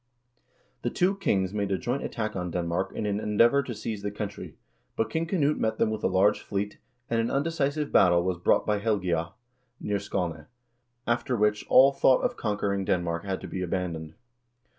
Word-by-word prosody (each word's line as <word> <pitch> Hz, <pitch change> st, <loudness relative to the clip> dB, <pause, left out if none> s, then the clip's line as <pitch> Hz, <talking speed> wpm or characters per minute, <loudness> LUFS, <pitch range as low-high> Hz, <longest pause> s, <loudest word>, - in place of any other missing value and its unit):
The -, -, -1 dB
two 185 Hz, +3 st, +1 dB
kings 95 Hz, -, 0 dB
made 100 Hz, -2 st, -1 dB
a 95 Hz, -, +1 dB
joint 125 Hz, +8 st, -2 dB
attack 110 Hz, -2 st, -3 dB
on 90 Hz, -1 st, -3 dB
Denmark 85 Hz, +2 st, -2 dB
in 110 Hz, -, -2 dB
an 100 Hz, 0 st, 0 dB
endeavor 115 Hz, +6 st, +3 dB
to 125 Hz, -4 st, -6 dB
seize 105 Hz, -1 st, -5 dB
the 100 Hz, -, -2 dB
country, 105 Hz, 0 st, -6 dB, 0.4 s
but 110 Hz, 0 st, -1 dB
King 165 Hz, +4 st, -1 dB
Knut 150 Hz, -5 st, +1 dB
met 110 Hz, 0 st, 0 dB
them 110 Hz, -, +2 dB
with 110 Hz, -1 st, -4 dB
a -, -, +4 dB
large 95 Hz, +2 st, +3 dB
fleet, 100 Hz, +1 st, -4 dB, 0.3 s
and 115 Hz, -1 st, +1 dB
an 115 Hz, -, -1 dB
undecisive 150 Hz, 0 st, -1 dB
battle 85 Hz, -2 st, +5 dB
was 90 Hz, -1 st, -1 dB
fought -, -, +3 dB
by 105 Hz, -1 st, +1 dB
Helgea, 90 Hz, -6 st, -1 dB, 0.5 s
near 100 Hz, -1 st, -1 dB
Skane, 90 Hz, -6 st, -3 dB, 0.6 s
after 120 Hz, +1 st, 0 dB
which 105 Hz, 0 st, +1 dB
all 135 Hz, +2 st, +7 dB
thought 130 Hz, -1 st, +4 dB
of 245 Hz, -1 st, 0 dB
conquer 105 Hz, -, -1 dB
ing 100 Hz, -1 st, -1 dB
Denmark 85 Hz, -1 st, -1 dB
had 95 Hz, -1 st, -3 dB
to -, -, -7 dB
be 95 Hz, -, -5 dB
abandoned. 85 Hz, -3 st, -3 dB
105 Hz, 190 wpm, -27 LUFS, 95-120 Hz, 0.6 s, all